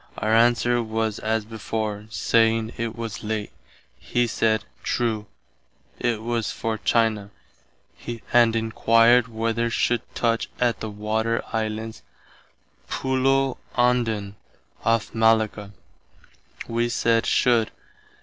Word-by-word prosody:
Our 110 +1 0
answer 120 +1 +3
was 110 -1 -2
as 110 0 -1
before, 110 -1 -4
saying 115 +3 +2
it 115 -1 -3
was 115 -2 -6
late. 105 -1 -3 0.5
He 120 - 0
said, 110 -1 +1 0.2
true, 110 -3 -1 0.7
it 115 -3 -1
was 115 -2 -1
for 110 -1 -3
China, 110 -2 +1 1.0
and 120 -2 +5
enquired 115 +2 +4
whether 115 +1 -1
should 120 +1 +1
touch 115 -1 0
at 120 -2 +1
the 110 - -4
Water 110 +2 -1
Islands 110 0 -3 0.9
[Pulo 135 0 +1 0.2
Ondan, 115 -5 +1 0.5
off 115 -1 +1
Malacca]. 110 -2 +2 1.0
Wee 120 +1 0
said 115 -1 +1
should. 120 -4 +3
115 Hz, 105 wpm, -24 LUFS, 110-115 Hz, 1.0 s, and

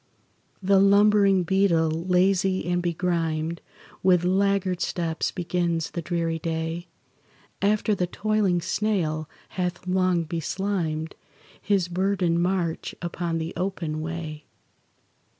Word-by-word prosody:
The 195 +1 +5
lumbering 200 -1 +5
beetle, 170 -3 +2
lazy 185 +3 +1
and 175 0 +1
begrimed, 170 -2 -1 0.4
With 180 -2 +4
laggard 190 -1 +1
steps 165 -2 -1
begins 170 -2 -1
the 170 - -3
dreary 165 -1 -1
day, 165 +1 -3 0.7
After 210 +2 +2
the 180 -3 0
toiling 205 -3 +1
snail 170 -5 -1 0.2
hath 180 -1 -3
long 185 -2 +2
beslimed 165 -1 -2 0.5
His 195 -4 +1
burdened 180 -1 +1
march 175 -2 -1
upon 170 -1 -3
the 165 +1 -4
open 175 -5 -3
way. 155 -2 -5
175 Hz, 105 wpm, -25 LUFS, 165-190 Hz, 0.7 s, The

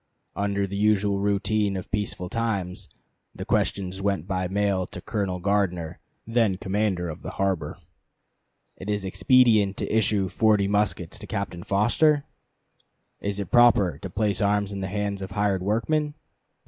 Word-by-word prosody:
Under 100 0 0
the 100 +1 -6
usual 100 -1 +2
routine 100 0 +1
of 95 - -8
peaceful 105 -3 -2
times 100 -4 -2 0.5
the - - -6
questions 95 -1 -1
went 100 -5 0
by 95 -1 -1
mail 100 -1 0
to - - -8
Colonel 100 -4 -2
Gardner, 90 -4 -1 0.3
then 115 -4 +1
commander 95 -2 -1
of 80 +1 -7
the - - -6
harbor, 95 -3 -1 1.0
"Is 105 0 -3
it - - -2
expedient 105 0 +4
to - - -2
issue 105 -3 +2
forty 105 0 +2
muskets 100 -4 -1
to - - -9
Captain 100 -4 -4
Foster? 140 - +2 1.0
Is 100 0 -3
it 100 - -5
proper 110 - +5
to 95 - -6
place 100 -1 0
arms 100 0 +1
in 100 - -4
the 95 - -3
hands 100 0 -2
of 95 - -5
hired 100 -1 0
workmen? 145 +10 0
100 Hz, 150 wpm, -25 LUFS, 95-105 Hz, 1.0 s, proper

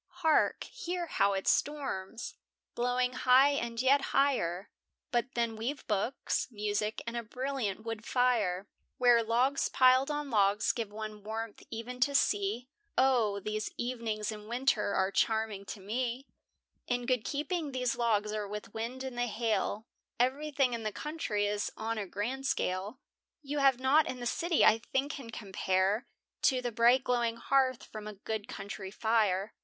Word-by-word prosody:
Hark, 315 -1 +3
hear 360 -7 -4
how 200 -11 +2
it 190 0 -3
storms! 240 -8 -1 0.4
blowing 250 +1 +1
high 260 +3 +5
and 235 -4 -2
yet 270 +3 +4 0.2
higher; 200 -10 +1 0.4
But 240 +2 -1
then 235 -1 0
we've 250 +6 -4
books, 215 +4 -1
music, 210 -1 -2
and 230 0 -4
a 235 - -1
brilliant 240 -3 -3
wood 225 -1 -5
fire, 220 -7 +1 0.3
Where 245 -2 +5
logs 245 +5 +1
piled 255 +2 +5
on 295 -2 -3
logs 205 -1 +3
give 225 -4 -4
one 215 0 -6
warmth 220 0 -5
e'en 235 +2 -6
to 280 +2 +2
see; 210 0 +1 0.3
Oh! 240 -6 +3
these 215 +1 -2
evenings 230 -3 -2
in 210 -1 -9
winter 235 -4 +1
are 190 +1 +2
charming 220 -2 0
to 205 - -7
me. 240 +6 -3 0.6
In 245 -1 -1
good 250 -3 +1
keeping 300 +1 -2
these 250 -2 0
logs 215 -3 +1
are 210 -1 -3
with 210 +2 -7
wind 240 +4 -4
and 260 -2 -5
the 245 - +1
hail, 220 -1 -1 0.3
Everything 275 0 +1
in 230 - -3
the 215 -1 -2
country 230 -8 -2
is 205 0 -1
on 225 0 -2
a 200 - -4
grand 250 +8 -3
scale. 195 +6 -1 0.4
You 290 +1 -2
have 270 -3 +4
nought 275 +4 +4
in 255 - -4
the 240 - -5
city 335 +6 +2
I 220 - +6
think 270 +5 -1
can 265 -6 -8
compare, 195 +1 0 0.3
To 260 -2 +3
the 245 -1 -3
bright 240 +3 +4
glowing 235 -2 0
hearth 260 -1 +2
from 215 -1 -8
a 215 - -6
good 215 +1 -4
country 200 -5 -6
fire. 215 -2 +1
235 Hz, 160 wpm, -31 LUFS, 210-260 Hz, 0.6 s, I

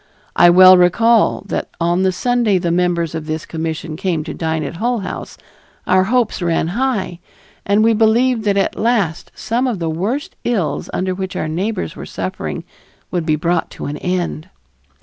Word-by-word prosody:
I 175 - +7
well 185 +1 +8
recall 225 +7 +3
that - - -3
on 175 +2 +1
the 190 0 +2
Sunday 235 +1 +1
the 175 -1 -1
members 170 -2 0
of 160 -1 -5
this 155 0 -3
commission 160 -1 -4
came 175 -2 -1
to - - -6
dine 160 -1 -2
at 160 +3 -6
Hull 235 +2 -1
House, 185 - -7 0.5
our 185 0 +3
hopes 235 -2 0
ran 165 -1 0
high, 210 -5 -2 0.5
and 205 +2 +3
we 225 0 +4
believed 225 +2 +2
that 200 -1 +2
at 195 - 0
last 210 -9 0
some 245 +4 -1
of 240 -5 -1
the 165 -2 -2
worst 210 - -3
ills 185 -12 -1
under 185 0 -1
which 190 0 -5
our - - -2
neighbors 190 +8 -3
were - - -8
suffering - - -5 0.5
would 175 -3 -2
be 155 - +3
brought 170 +2 -1
to - - -5
an 145 +1 -4
end. 180 -3 -3
185 Hz, 180 wpm, -18 LUFS, 165-220 Hz, 0.5 s, well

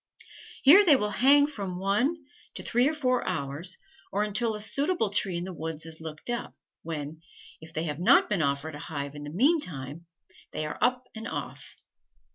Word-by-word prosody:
Here 335 +10 +9
they 320 -7 +7
will 210 -5 0
hang 280 +7 +5
from 200 -11 -5
one 205 - +1 0.4
to - - -6
three 245 +3 +2
or 315 - -3
four 255 -4 +1
hours, 165 +2 -3 0.3
or 205 +2 +1
until 215 +2 0
a - - -6
suitable 250 - 0
tree 195 -3 0
in 170 - -3
the 185 0 -6
woods 160 -1 -5
is 160 0 -9
looked 160 +8 -6
up, 240 - -4 0.3
when, 155 -1 -6 0.4
if 160 0 -11
they 160 0 -2
have 150 -2 -3
not 175 - +5
been 195 -5 0
offered 140 +2 -1
a 145 - -7
hive 140 -3 -5
in 145 - -8
the - - -6
mean 275 - +3
time, 150 - -7 0.5
they 155 - -2
are 150 - -5
up 250 0 +2
and 220 +1 -6
off. - - -6
190 Hz, 195 wpm, -28 LUFS, 155-245 Hz, 0.5 s, Here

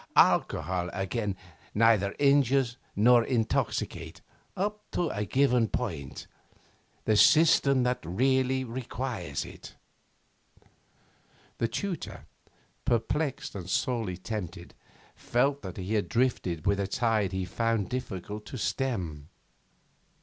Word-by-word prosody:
Alcohol, 90 -1 +3
again, 95 +1 -2 0.4
neither 105 -3 +4
injures 140 -3 +3 0.2
nor 120 +3 +6
intoxicates 115 -3 -1 0.4
up 210 +2 -1
to 175 -3 -1
a 105 +1 -2
given 125 +1 +3
point 80 - -4 0.8
the 110 - +3
system 140 0 +5
that 125 0 +1
really 130 +8 +1
requires 115 - -4
it.' - - -11 1.8
The 115 - +2
tutor, 180 - -4 0.6
perplexed 125 +5 -1
and 90 -3 -7
sorely 110 -5 -1
tempted, 100 -2 -6 0.4
felt 140 +4 +1
that 95 -3 -7
he 100 +3 0
drifted 115 -10 -1
with 100 0 +2
a 100 - 0
tide 110 -3 +1
he 95 -1 -2
found 115 +2 0
it - - -13
difficult 105 -3 -5
to 130 - -6
stem. 90 - -2
115 Hz, 105 wpm, -29 LUFS, 95-130 Hz, 1.8 s, nor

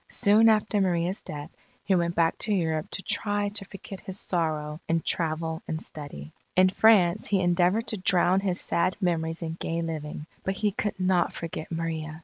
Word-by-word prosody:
Soon 220 0 +5
after 215 -1 +2
Maria's 180 0 0
death, 150 +1 -8 0.3
he 195 - +1
went 170 -1 +1
back 165 -1 +2
to 215 - 0
Europe 160 -5 0
to 190 - -6
try 205 -1 0
to 200 -1 -1
forget 195 0 -10
his 190 +1 -5
sorrow 155 -3 -2
in 165 0 +1
travel 160 0 -1
and 160 - -3
study. 140 - -8 0.2
In 185 0 +6
France 195 -2 +4
he 200 - +2
endeavoured 180 +5 +2
to 220 - -2
drown 185 0 +3
his 190 -2 0
sad 185 +2 0
memories 165 -3 -1
in 165 0 -4
gay 165 0 -2
living, 150 -2 -5 0.2
but 190 - -1
he 210 +1 0
could 205 0 -3
not 185 -1 +2
forget 165 -1 -6
Maria. 160 -1 -4
175 Hz, 180 wpm, -27 LUFS, 160-195 Hz, 0.3 s, In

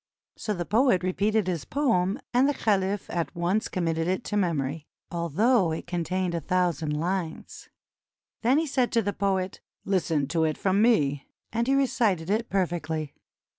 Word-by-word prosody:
So 210 - -3
the 175 -1 -3
poet 215 -4 +3
repeated 205 +3 +1
his 175 -4 -2
poem, 230 -7 +1
and 255 +3 +4
the 290 - 0
caliph 200 -1 0
at 170 +1 -2
once 180 +6 0
committed 165 -3 -1
it 185 +6 -1
to 210 - -4
memory, 155 -6 -1 0.2
although 175 - +2
it 160 - -4
contained 180 +1 -2
a 170 - 0
thou 180 +3 +2
sand 150 -1 -3
lines. 175 -1 -4 0.7
Then 250 +5 +3
he 320 - +2
said 260 -4 0
to 230 -1 +3
the 205 - -1
poet: 190 -2 -1 0.2
"Listen 160 -7 +1
to 165 -1 +1
it 155 -1 0
from 195 +1 +2
me," 145 - +2 0.3
and 230 +1 0
he 270 - +3
recited 215 -10 +1
it 225 +2 0
perfectly. 160 -5 -2
185 Hz, 170 wpm, -27 LUFS, 165-215 Hz, 0.7 s, and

